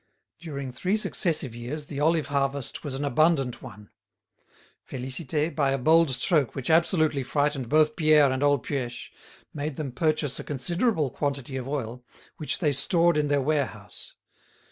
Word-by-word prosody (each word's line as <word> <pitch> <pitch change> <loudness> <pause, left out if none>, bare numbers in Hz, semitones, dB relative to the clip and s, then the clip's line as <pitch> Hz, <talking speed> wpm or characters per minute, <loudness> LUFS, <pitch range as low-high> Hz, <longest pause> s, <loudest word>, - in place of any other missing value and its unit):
During 140 -5 -6
three 185 +12 0
successive 165 - -1
years 125 +6 -6
the 140 -1 -6
olive 160 0 +2
harvest 140 -1 -1
was 140 -3 -4
an 140 +2 -2
abundant 140 -2 +2
one. 105 +1 -12 1.0
Félicité, 135 +5 -2
by 140 -3 +2
a - - +1
bold 160 +4 +4
stroke 135 +1 +1
which 135 +2 -2
absolutely 160 -3 +3
frightened 145 -1 -1
both 155 0 +3
Pierre 155 -4 +5
and 130 +1 -2
old 145 -4 +2
Puech, 125 -4 -4 0.4
made 150 0 -4
them 145 -3 -4
purchase 155 0 0
a - - -5
considerable 160 - 0
quantity 140 -2 -3
of 130 -1 -4
oil, 125 -4 -4 0.3
which 155 - -2
they 150 -5 +1
stored 170 +5 +3
in 150 -1 +1
their 145 -1 +2
warehouse. 130 -8 -3
145 Hz, 155 wpm, -26 LUFS, 130-155 Hz, 1.0 s, Pierre